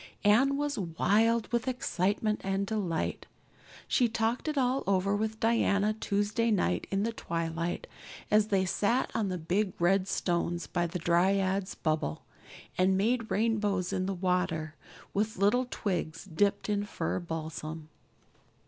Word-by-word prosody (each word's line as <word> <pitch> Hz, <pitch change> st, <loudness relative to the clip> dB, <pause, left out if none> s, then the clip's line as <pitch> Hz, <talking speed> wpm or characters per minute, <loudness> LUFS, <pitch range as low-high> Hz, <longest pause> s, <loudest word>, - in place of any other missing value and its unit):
Anne 255 Hz, +7 st, +4 dB
was 290 Hz, -4 st, -1 dB
wild 215 Hz, +6 st, +2 dB
with 240 Hz, +2 st, 0 dB
excitement 210 Hz, -3 st, 0 dB
and 195 Hz, +1 st, 0 dB
delight. 195 Hz, -6 st, -2 dB, 0.6 s
She 245 Hz, -3 st, +3 dB
talked 225 Hz, +5 st, -1 dB
it 305 Hz, -1 st, -1 dB
all 260 Hz, 0 st, +1 dB
over 195 Hz, +1 st, +2 dB
with 220 Hz, +1 st, -2 dB
Diana 215 Hz, -2 st, +2 dB
Tuesday 215 Hz, +2 st, 0 dB
night 90 Hz, -, +1 dB
in 195 Hz, +1 st, 0 dB
the 230 Hz, +1 st, -1 dB
twilight, 165 Hz, -3 st, -3 dB, 0.5 s
as 210 Hz, 0 st, +4 dB
they 195 Hz, -3 st, +2 dB
sat 225 Hz, +7 st, +1 dB
on 215 Hz, -4 st, 0 dB
the 185 Hz, -, -2 dB
big 185 Hz, +4 st, 0 dB
red 185 Hz, +2 st, +3 dB
stones 175 Hz, -2 st, -1 dB
by 175 Hz, -1 st, -1 dB
the 175 Hz, +2 st, -4 dB
Dryad's 190 Hz, +3 st, +1 dB
Bubble 155 Hz, -, -1 dB, 0.6 s
and 190 Hz, +1 st, +4 dB
made 230 Hz, +3 st, +1 dB
rainbows 205 Hz, -4 st, 0 dB
in 185 Hz, 0 st, -1 dB
the 195 Hz, -, -2 dB
water 180 Hz, -4 st, -1 dB, 0.4 s
with 215 Hz, +2 st, -1 dB
little 210 Hz, +6 st, +3 dB
twigs 175 Hz, -6 st, -3 dB
dipped 195 Hz, +3 st, 0 dB
in 205 Hz, -1 st, 0 dB
fir 205 Hz, -, -2 dB
balsam. 160 Hz, -2 st, -5 dB
200 Hz, 140 wpm, -30 LUFS, 175-220 Hz, 0.6 s, Anne